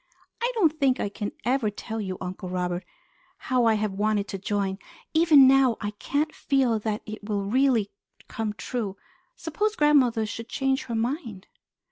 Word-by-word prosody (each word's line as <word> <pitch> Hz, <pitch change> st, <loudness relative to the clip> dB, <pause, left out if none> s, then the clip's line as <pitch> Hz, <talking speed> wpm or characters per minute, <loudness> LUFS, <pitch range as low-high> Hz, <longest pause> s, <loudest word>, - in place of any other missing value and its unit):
I 480 Hz, +1 st, +1 dB
don't 320 Hz, -8 st, +2 dB
think 270 Hz, -3 st, +2 dB
I 205 Hz, -, -1 dB
can 205 Hz, 0 st, -5 dB
ever 245 Hz, -3 st, +1 dB
tell 220 Hz, +2 st, -5 dB
you, 190 Hz, -2 st, -4 dB
Uncle 185 Hz, 0 st, -6 dB
Robert, 180 Hz, 0 st, -2 dB, 0.5 s
how 250 Hz, -2 st, +1 dB
I 225 Hz, -1 st, +4 dB
have 210 Hz, -1 st, -1 dB
wanted 205 Hz, +1 st, 0 dB
to 195 Hz, -, -4 dB
join. 195 Hz, -1 st, -2 dB, 0.3 s
Even 315 Hz, -4 st, +7 dB
now 265 Hz, -3 st, +4 dB
I 205 Hz, -1 st, -3 dB
can't 285 Hz, +8 st, -2 dB
feel 260 Hz, -6 st, +1 dB
that 215 Hz, 0 st, -3 dB
it 215 Hz, 0 st, -8 dB
will 200 Hz, -1 st, 0 dB
really 235 Hz, -2 st, +2 dB, 0.4 s
come 220 Hz, -2 st, -3 dB
true. 210 Hz, -3 st, -4 dB, 0.4 s
Suppose 415 Hz, +6 st, -2 dB
grandmother 265 Hz, -, +3 dB
should 230 Hz, +2 st, -7 dB
change 270 Hz, +2 st, 0 dB
her 235 Hz, -, -4 dB
mind?" 230 Hz, -, -3 dB
225 Hz, 165 wpm, -26 LUFS, 205-270 Hz, 0.5 s, Even